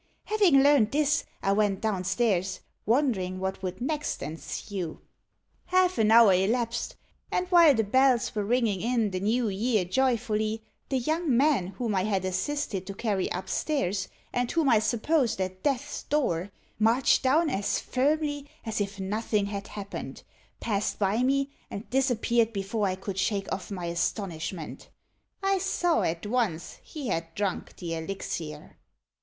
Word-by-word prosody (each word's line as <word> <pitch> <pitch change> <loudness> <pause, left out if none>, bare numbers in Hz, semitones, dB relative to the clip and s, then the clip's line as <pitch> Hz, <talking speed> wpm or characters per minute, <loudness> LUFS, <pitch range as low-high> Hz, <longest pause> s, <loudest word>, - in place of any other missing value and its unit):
Having 390 -11 +4
learnt 280 -7 +5
this, 300 +1 +2 0.2
I 195 - +2
went 200 -1 +2
down 200 -4 -1
stairs, 190 -2 0 0.3
wondering 215 -8 +1
what 190 0 -3
would 185 -1 -4
next 295 +4 -2
ensue. 165 +3 -5 0.7
Half 365 0 +2
an 215 -1 +4
hour 225 -3 +8
elapsed, 230 +5 0 0.4
and 360 - +1
while 340 -5 +7
the 225 - +2
bells 255 +3 +3
were 210 - -1
ringing 220 -3 +1
in 230 -3 +1
the 185 - -2
new 225 +5 +1
year 210 0 +1
joyfully, 220 0 0 0.3
the 270 - +1
young 310 0 +1
man 275 -9 +3
whom 225 +3 -3
I 190 -1 +1
had 195 -3 0
assisted 190 0 -2
to 195 - -6
carry 200 -4 -1
up 180 - -4
stairs, 205 - -1 0.3
and 245 -1 0
whom 325 -4 +2
I 225 -3 +5
supposed 235 0 +1
at 185 0 -3
death's 285 0 -1
door, 200 - 0 0.3
marched 230 +4 +4
down 305 +4 +3
as 200 -3 0
firmly 290 +2 0 0.2
as 220 -2 -2
if 200 0 -4
nothing 210 +1 0
had 200 0 -5
happened, 200 -1 -7 0.4
passed 205 -2 -1
by 205 +3 +1
me, 275 +2 +1 0.2
and 200 - -7
disappeared, 240 -3 +2
before 200 +1 -1
I 185 - -1
could 195 0 -5
shake 195 -1 -1
off 190 - -5
my 185 -4 -4
astonishment. 170 -1 -3 0.5
I 390 0 +2
saw 355 -3 +1
at 165 +4 -2
once 205 -7 -1
he 285 -7 -6
had 165 -2 -3
drunk 200 -3 -3
the 170 -2 -5
elixir." 160 -3 -5
220 Hz, 155 wpm, -27 LUFS, 190-265 Hz, 0.7 s, hour